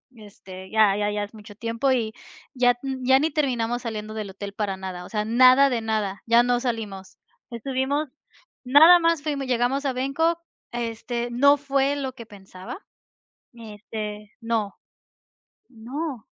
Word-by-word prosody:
este, 190 -3 -12
ya 215 -3 +4
ya 205 0 0
ya 205 0 -2
es 205 - -9
mucho 210 -1 -13
tiempo 230 +5 -1
y 225 -4 0 0.4
ya 245 -2 +3
n 265 -1 -3
ya 265 +1 +5
ni 315 +3 0
terminamos 245 -5 -1
saliendo 215 -3 -5
del 215 -2 -5
hotel 200 +1 -8
para 200 -2 -3
nada, 185 -2 -7
o - - -12
sea, 210 -2 -2
nada 255 +4 +6
de 240 -3 -1
nada, 215 -3 -2
ya 235 +1 +5
no 245 0 +1
salimos. 220 -6 -5 0.3
Estuvimos 265 +5 -2 0.6
nada 310 +7 +8
más 330 -3 +1
fuimos, 285 -3 -3
llegamos 255 +3 0
a 270 - 0
Bangkok, 285 +6 0 0.3
este, 235 0 -4
no 280 +4 +5
fue 280 0 0
lo 270 -2 -4
que 240 -3 -11
pensaba, 190 - -10 0.8
este, 210 -1 -8
no, 225 -3 -1 1.0
no. 255 +2 -6
235 Hz, 155 wpm, -24 LUFS, 210-270 Hz, 1.0 s, nada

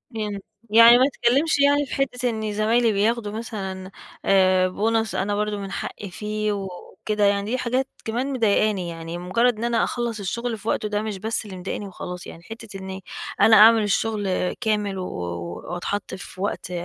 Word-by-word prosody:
امم، 210 -2 -3 0.3
يعني 230 +2 +8
ما 255 - +5
اتكلمش 280 +3 +2
يعني 285 +1 +4
في - - -8
حتة 250 -2 0
إن 220 -2 -3
زمايلي 225 +2 +2
بياخدوا 210 +1 0
مثلًا 195 -4 -6 0.3
آآ، 185 -1 +4
bonus 220 +3 0
أنا 205 +2 0
برضه 210 0 -1
من 195 -1 -6
حقي 200 - -5
فيه 215 +2 -2
وكده، 200 +2 -4
يعني 200 +1 +1
دي 255 - +1
حاجات 255 +2 0 0.2
كمان 250 +5 -2
مضيقاني، 210 -6 +1
يعني 165 0 -6
مجرد 215 +7 +1
إن 220 - -5
أنا 235 -1 +2
أخلَّص 235 -3 -2
الشغل 230 +4 -3
في 215 - -12
وقته 215 - 0
ده 210 0 -1
مش 215 -2 -4
بس 220 +3 -3
اللي 190 -3 -8
مضايقني 190 +2 -5
وخلاص، 180 -1 -7
يعني 165 - -11
حتة 225 -1 -9
إني 190 0 -7 0.4
أنا 220 - +7
أعمل 220 +1 +8
الشغل 205 -3 0
كامل 210 -3 -1
و 185 - -3
و 85 - -6
وأتحط 195 +3 -3
في 185 0 -10
وقت 200 -2 -3
210 Hz, 180 wpm, -23 LUFS, 190-230 Hz, 0.4 s, يعني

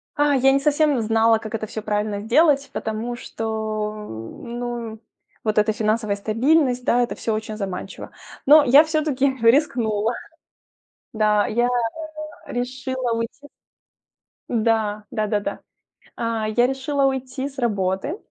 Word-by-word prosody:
А, 290 -1 +3
я 270 +1 +4
не 275 - +3
совсем 290 -2 +2
знала, 225 +1 +3
как 220 0 -6
это 215 - -3
всё 215 0 -6
правильно 210 -1 -2
сделать, 280 +4 +3
потому 220 +2 -3
что, 220 -3 -3
ну, 235 - -6 0.4
вот 215 -1 -1
эта 215 +1 +3
финансовая 215 -1 0
стабильность, 250 +5 +1
да, 245 - +3
это 240 - -1
всё 225 - -2
очень 215 0 -4
заманчиво. 190 -3 -6 0.3
Но 300 +2 +8
я 280 +3 +7
всё-таки 295 -4 0
рискнула. 230 -3 +2 1.0
Да, 210 -1 +3
я 240 +2 +1 0.8
решила 255 0 -3
уйти. 230 +5 -5 1.0
Да, 220 -2 0
да-да-да. 215 -3 -2 0.6
А, 230 -2 -2
я 240 +3 +3
решила 270 +1 0
уйти 265 0 -2
с 270 - -11
работы. 205 - -1
230 Hz, 125 wpm, -22 LUFS, 215-265 Hz, 1.0 s, Но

